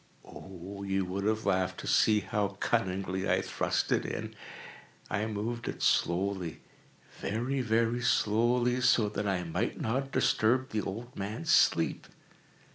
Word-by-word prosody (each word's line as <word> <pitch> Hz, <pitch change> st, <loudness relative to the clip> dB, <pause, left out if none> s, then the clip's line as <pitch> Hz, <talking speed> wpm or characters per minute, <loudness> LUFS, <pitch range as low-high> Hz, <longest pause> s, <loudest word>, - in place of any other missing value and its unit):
Oh, 95 Hz, +1 st, -9 dB
you 95 Hz, -1 st, -1 dB
would 95 Hz, +2 st, -3 dB
have 110 Hz, +1 st, 0 dB
laughed 95 Hz, -2 st, 0 dB
to -, -, -9 dB
see 105 Hz, -1 st, +4 dB
how 100 Hz, 0 st, -2 dB
cunningly 95 Hz, 0 st, -1 dB
I -, -, +2 dB
thrust -, -, -1 dB
it -, -, +2 dB
in! -, -, -5 dB, 0.8 s
I 105 Hz, +2 st, 0 dB
moved 110 Hz, +2 st, -4 dB
it -, -, -4 dB
slowly—very, 100 Hz, +7 st, -2 dB
very 115 Hz, +1 st, +1 dB
slowly, 120 Hz, +2 st, +2 dB
so 110 Hz, -4 st, +4 dB
that 105 Hz, 0 st, -3 dB
I 95 Hz, -2 st, 0 dB
might 85 Hz, -2 st, -2 dB
not 135 Hz, +4 st, -1 dB
disturb 130 Hz, +3 st, +2 dB
the 110 Hz, -, 0 dB
old 115 Hz, +6 st, -6 dB
man's 100 Hz, -2 st, -3 dB
sleep. -, -, +3 dB
105 Hz, 135 wpm, -30 LUFS, 95-115 Hz, 0.8 s, see